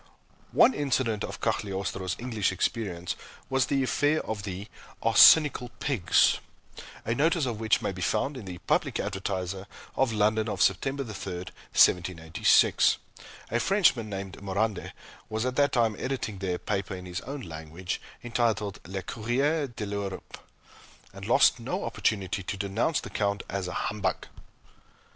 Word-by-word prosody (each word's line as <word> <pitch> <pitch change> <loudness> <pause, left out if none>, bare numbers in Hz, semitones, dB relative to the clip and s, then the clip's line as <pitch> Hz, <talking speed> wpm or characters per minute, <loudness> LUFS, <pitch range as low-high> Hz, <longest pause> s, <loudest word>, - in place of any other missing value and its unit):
One 265 - +6
incident 130 -7 0
of - - -6
Cagliostro's 95 -2 -2
English 110 -5 -1
experience 95 -2 -2 0.4
was 135 -1 +2
the 135 -1 +1
affair 145 +4 +1
of 110 -2 -3
the 100 +1 -6 0.4
"Arsenical 145 -6 +7
Pigs" 110 - +3 0.7
a 115 - +1
notice 155 +4 +2
of 115 -4 -3
which 110 -1 +2
may - - 0
be 95 -1 -8
found 110 +10 0
in 125 -6 -8
the 90 -2 -7
"Public - - +1
Advertiser," 95 0 -3 0.3
of 130 -3 +2
London 110 +1 +1
of - - -3
September 135 +8 +1
3, 110 -4 -7 0.2
1786. 90 -1 +3 0.5
A 120 - +2
Frenchman 150 - +3
named 95 -1 -6
Morande, 100 +1 -1 0.4
was 110 +2 -2
at 130 0 -1
that 145 -1 +3
time 115 -4 +2
editing 125 -7 -3
there 95 -2 -1
a - - -3
paper 95 +1 -3
in 90 0 -8
his 90 -1 -5
own 140 +2 -6
language, 80 +1 -6 0.2
entitled 115 -4 0
"Le 95 0 -4
Courrier 135 - 0
de 120 -3 -6
l'Europe," 100 -1 -5 0.7
and - - -8
lost - - +5
no - - -3
opportunity 100 -2 -1
to 100 +2 -4
denounce 100 +10 0
the - - -9
Count 100 -1 -1
as 95 -2 -3
a 90 - -5
humbug. 95 -4 -2
105 Hz, 150 wpm, -28 LUFS, 95-125 Hz, 0.7 s, Arsenical